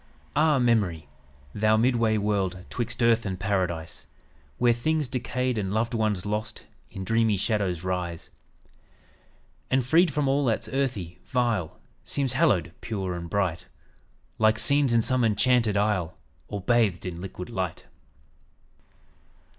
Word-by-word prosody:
"Ah, 155 0 +4
Memory! 105 - +1 0.5
thou 110 +1 +3
midway 115 -2 +2
world 100 -3 0
'Twixt 120 0 -2
earth 115 -1 +4
and 95 -3 -4
paradise, 90 -5 -2 0.5
Where 120 -1 +4
things 150 +5 0
decayed 125 -1 -2
and 95 -2 -2
loved 115 +3 0
ones 110 -5 0
lost 105 +2 -4 0.2
In 95 - -7
dreamy 110 +1 +2
shadows 95 -4 -1
rise. 90 -2 -4 1.4
"And 130 -1 +2
freed 165 +6 +4
from 145 0 0
all 140 +2 +2
that's 115 -3 0
earthy, 120 -11 -2
vile, 115 -10 -1 0.2
Seems 135 -3 -1
hallowed, 120 - +2
pure 95 -5 -3
and 85 -1 -6
bright, 90 -3 -1 0.7
Like 110 0 +4
scenes 140 +4 +3
in 115 -1 +3
some 130 0 +2
enchanted 115 -1 +2
isle, 100 -5 0 0.3
All 100 -1 -5
bathed 110 -4 +1
in 90 -1 -5
liquid 95 +2 -7
light." 95 -6 -3
110 Hz, 130 wpm, -26 LUFS, 95-120 Hz, 1.4 s, Ah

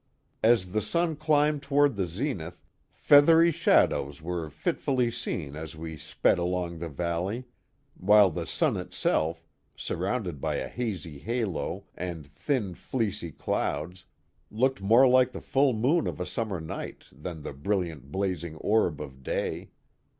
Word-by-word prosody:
As 110 -5 +3
the 110 - +1
sun 170 - 0
climbed 150 -1 +2
toward 140 -2 +3
the 95 -3 -1
zenith 90 - -4 0.2
feathery 165 +4 +6
shadows 70 - +2
were 85 -1 -4
fitfully 125 - 0
seen 90 -11 -4
as 80 +1 -7
we 80 0 -6
sped 80 - +1
along 90 -1 -2
the 85 0 -4
valley, 90 - -2 0.5
while 105 0 +5
the - - -4
sun - - +1
itself, 80 +1 -1 0.3
surrounded 90 - -3
by - - -1
a - - -2
hazy 95 - -4
halo 110 - -2
and 85 -4 -5
thin, 95 - -2
fleecy 100 -5 -3
clouds, 85 +5 -3 0.4
looked 130 +2 +1
more 115 +7 +6
like 130 0 +4
the - - -5
full 135 0 +2
moon 130 +9 +2
of - - -4
a 90 - -2
summer 105 -5 -3
night 80 0 -6
than 80 +2 -7
the - - -5
brilliant, 80 -3 -2
blading 90 -4 -2
orb 100 -8 +2
of 65 -3 -8
day. - - -3
95 Hz, 145 wpm, -28 LUFS, 80-125 Hz, 0.5 s, feathery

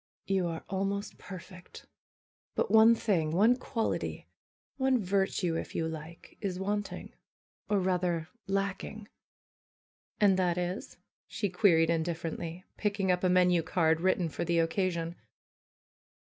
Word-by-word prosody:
^^You 190 -2 +1
are 165 -1 -5
almost 195 +1 -2
perfect! 185 -1 -11 0.7
Btit - - +1
one 225 +1 +7
thing, 180 -9 +1
one 215 +8 +5
quality, 230 -3 -3 0.5
one 265 -1 +3
virtue 190 -3 0
if - - -5
you 160 - 0
like, 160 +1 -9
is 190 -4 -2
wanting, 205 +2 -3 0.6
or 205 - +3
rather, 180 -3 0 0.2
lacking." 195 +2 -3 1.1
^'And 200 -3 +5
that 180 -2 +1
is?" 180 +2 -3 0.3
she 205 - -2
queried 170 -3 +4
indifferently, 165 +1 -3
picking 200 -3 0
up 180 0 0
a 185 - +4
menu 180 -1 +4
card, 160 0 +1
written 185 -1 +2
for 160 +2 -4
the 170 0 +1
occasion. 170 0 0
185 Hz, 125 wpm, -30 LUFS, 170-200 Hz, 1.1 s, one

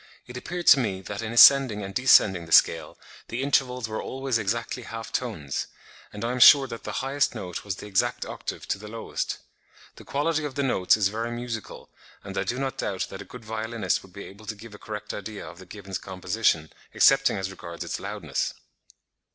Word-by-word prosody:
600.), - - -27
"It - - -4
appeared 175 +6 -5
to 140 - +8
me 100 -6 -2
that 100 +2 -6
in 110 -1 -4
ascending 120 -3 +7
and 95 0 -6
descending 95 -9 +4
the - - -14
scale, - - +4 0.3
the 120 +3 -3
intervals 125 -4 +1
were 110 0 -4
always 135 -3 -2
exactly 115 +4 -2
half 115 -1 -8
tones; 85 - -3 0.4
and 105 +2 -5
I 120 - -1
am 125 - -3
sure 140 +2 +9
that 115 -3 -8
the - - -4
highest 140 +1 0
note 90 -3 -6
was 100 -2 -3
the - - -10
exact 100 -2 0
octave - - -6
to - - -1
the 105 - -10
lowest. 115 +1 -4 0.6
The - - -12
quality 155 +2 -1
of 145 -3 -5
the 140 - 0
notes 110 -7 +3
is 100 -2 +2
very 115 +3 -3
musical; 120 -2 -6 0.3
and - - -8
I - - 0
do 120 - -3
not 135 -1 -3
doubt 95 -2 -2
that 95 - -7
a - - -9
good 125 -3 -12
violinist 110 +1 -2
would 95 - -17
be 100 +2 -9
able 105 +2 -13
to 110 - -4
give 110 +1 -12
a 105 - -12
correct 105 -1 -6
idea 105 0 -7
of 85 - -11
the 95 - -13
gibbon's 95 -1 -7
composition, 90 -3 -1 0.2
excepting - - +5
as 95 0 -3
regards 85 -3 -8
its - - -4
loudness." - - -3
110 Hz, 210 wpm, -26 LUFS, 95-125 Hz, 0.6 s, sure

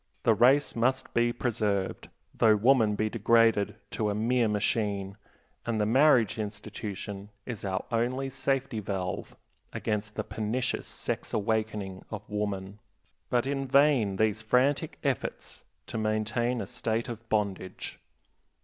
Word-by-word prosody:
The 115 - +5
race 130 +7 +4
must 130 +3 0
be 120 0 +3
preserved, 105 -5 -1 0.2
though 110 -1 +5
woman 110 -1 +4
be 110 +1 0
degraded 115 -2 +3 0.2
to 105 -1 -1
a 100 - -1
mere 120 +2 +2
machine, 100 -2 0 0.5
and 115 -2 -1
the 105 - +2
marriage 125 -2 +4
institution 105 -1 -6 0.2
is 120 -6 -6
our 95 0 -2
only 125 +4 0
safety 135 -2 -1
valve 95 -3 -4 0.4
against 105 -1 -2
the - - -2
pernicious 110 +3 -2
sex - - -3
awakening 105 -3 -1
of 105 0 -7
woman. 100 -1 -3 0.5
But 120 0 +2
in 135 0 -2
vain 135 -7 +4
these 110 +1 +1
frantic 135 +7 +1
efforts 135 -5 -3 0.2
to 110 - -4
maintain 110 +3 0
a - - -3
state 115 +1 -2
of 115 -1 -8
bondage. 100 -3 -2
110 Hz, 130 wpm, -29 LUFS, 105-120 Hz, 0.5 s, The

